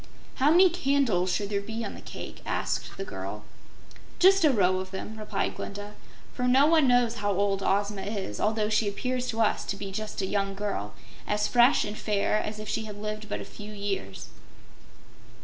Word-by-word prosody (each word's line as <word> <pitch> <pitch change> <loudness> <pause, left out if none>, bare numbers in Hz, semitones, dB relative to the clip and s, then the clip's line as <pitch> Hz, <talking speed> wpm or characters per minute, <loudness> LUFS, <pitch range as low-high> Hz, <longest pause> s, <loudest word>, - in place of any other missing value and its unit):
"How 275 +2 +4
many 355 +4 +7
candles 270 - +1
should 205 +1 -1
there 200 -1 0
be 225 +2 -5
on 200 - -5
the - - -10
cake?" - - -8
asked - - -2
the 390 - -4
girl. 370 - -6 0.7
"Just 390 +1 +6
a 310 - +6
row 185 -5 +3
of 185 0 -5
them," 195 +3 -6
replied 215 -2 -2
Glinda, 205 +1 -7 0.4
"for 250 - -1
no 265 +3 +6
one 315 -3 +5
knows 245 -2 +3
how 205 -1 0
old 200 0 +1
Ozma 200 +1 0
is, 195 - -4
although 215 0 +1
she 215 0 +2
appears 250 +5 -2
to 225 0 -1
us 215 - +2
to - - -3
be 195 -1 -6
just 215 +2 -5
a 195 - 0
young 195 0 -1
girl 195 - -3 0.3
as 210 0 +1
fresh 245 +2 +5
and 210 0 -5
fair 210 0 +1
as 215 0 -5
if 215 0 -7
she 220 - -2
had 210 -1 -8
lived 215 0 -5
but - - -3
a - - -7
few 210 0 -10
years." 200 - -4
210 Hz, 200 wpm, -28 LUFS, 200-240 Hz, 0.7 s, many